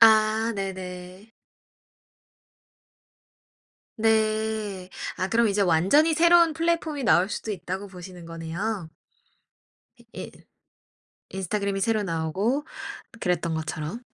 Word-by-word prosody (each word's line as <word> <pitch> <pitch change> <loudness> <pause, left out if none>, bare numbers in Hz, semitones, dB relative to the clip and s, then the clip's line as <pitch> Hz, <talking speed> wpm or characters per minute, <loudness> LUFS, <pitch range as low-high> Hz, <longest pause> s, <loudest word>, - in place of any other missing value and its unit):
아 220 0 +5
네네. 185 +1 -6 2.7
네. 215 -3 +1 0.3
아 185 +1 0
그럼 230 +2 +3
이제 200 0 +1
완전히 195 - +4
새로운 340 0 +6
플랫폼이 325 -3 0
나올 180 0 +4
수도 215 - -3
있다고 190 +1 -4
보시는 180 -2 -10
거네요. 165 +3 -4 1.1
이 - - -20
인 - - -7 1.0
인스타그램이 195 +1 -2
새로 215 0 +2
나오고 190 - 0 0.6
그랬던 170 -2 0
것처럼? 160 +6 -4
200 Hz, 215 characters per minute, -26 LUFS, 180-225 Hz, 2.7 s, 새로운